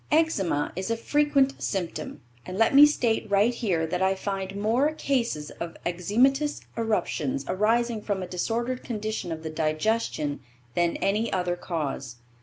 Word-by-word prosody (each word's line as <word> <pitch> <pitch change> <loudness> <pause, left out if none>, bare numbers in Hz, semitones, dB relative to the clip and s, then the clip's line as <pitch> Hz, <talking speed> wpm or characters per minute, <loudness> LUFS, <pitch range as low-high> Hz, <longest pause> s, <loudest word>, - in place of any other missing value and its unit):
Eczema 205 - +1
is 190 +3 -3
a 230 - 0
frequent 280 +1 +2
symptom, 170 -5 -3 0.2
and 185 +1 -6
let 225 +4 +3
me 290 +2 +10
state 235 -7 0
right 205 +4 +3
here 190 -9 0
that 180 +3 -2
I 190 0 +3
find 195 0 -4
more 245 +9 +2
cases 235 - -1
of 170 -1 -5
eczematous 250 - +1
eruptions 175 - -1
arising 225 +3 +1
from 200 -3 -2
a - - -5
disordered 235 +8 -2
condition 215 -6 -3
of 160 0 -5
the 160 - -4
digestion 155 -1 0 0.3
than 175 -1 +1
any 210 +4 0
other 180 -2 0
cause. 145 -8 -4
200 Hz, 150 wpm, -26 LUFS, 175-235 Hz, 0.3 s, me